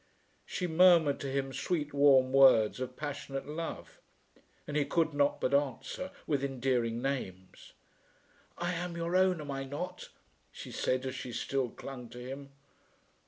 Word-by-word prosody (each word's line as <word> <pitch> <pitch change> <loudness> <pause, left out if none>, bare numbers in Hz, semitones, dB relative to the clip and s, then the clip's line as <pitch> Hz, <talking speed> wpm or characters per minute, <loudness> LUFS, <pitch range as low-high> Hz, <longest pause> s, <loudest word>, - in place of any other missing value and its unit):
She 180 - -3
murmured 170 -3 +5
to 140 - -4
him 135 0 -2
sweet 150 +2 -2
warm 135 -2 +5
words 130 -5 +6
of 130 0 -5
passionate 140 -2 -5
love, 165 +2 -6 0.7
and 145 - -6
he 150 - +3
could 165 +1 +1
not 145 0 +2
but 130 - 0
answer 140 +5 -1 0.2
with 140 -3 0
endearing 125 -3 0
names. 95 -10 -5 0.8
"I 175 +1 -1
am 175 0 -4
your 170 +1 -2
own, 185 -2 +4
am 145 -2 -6
I 135 0 -3
not?" 175 +7 -6 0.4
she - - -9
said 130 +1 -1
as 130 - -3
she 130 -1 -6
still 135 +1 -1
clung 125 0 -9
to - - -11
him. 135 +3 -7
140 Hz, 155 wpm, -31 LUFS, 130-160 Hz, 0.8 s, words